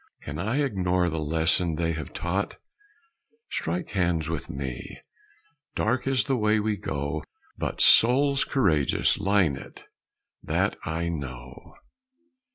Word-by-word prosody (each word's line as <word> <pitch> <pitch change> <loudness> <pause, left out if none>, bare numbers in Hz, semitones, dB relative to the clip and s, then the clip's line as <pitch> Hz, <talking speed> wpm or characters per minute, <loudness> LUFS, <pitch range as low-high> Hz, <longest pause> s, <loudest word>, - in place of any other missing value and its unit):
Can 75 +2 -6
I 120 +11 0
ignore 90 -7 +1
the 80 - -2
lesson 80 +2 +1
they 85 +1 0
have 80 -1 -5
taught? 95 +4 -2 0.9
Strike 85 +2 -2
hands 85 -5 0
with 80 -2 -4
me! 65 -3 -6 0.8
Dark 120 +4 0
is 130 -5 +2
the 135 - 0
way 110 -2 +2
we 105 0 0
go, 75 -5 -3 0.4
But - - -2
souls 135 +4 +6
courageous 80 - +2
line 95 -7 +2
it 70 - -11 0.6
that - - 0
I 85 +1 -2
know! 65 -6 -7
85 Hz, 125 wpm, -26 LUFS, 80-105 Hz, 0.9 s, souls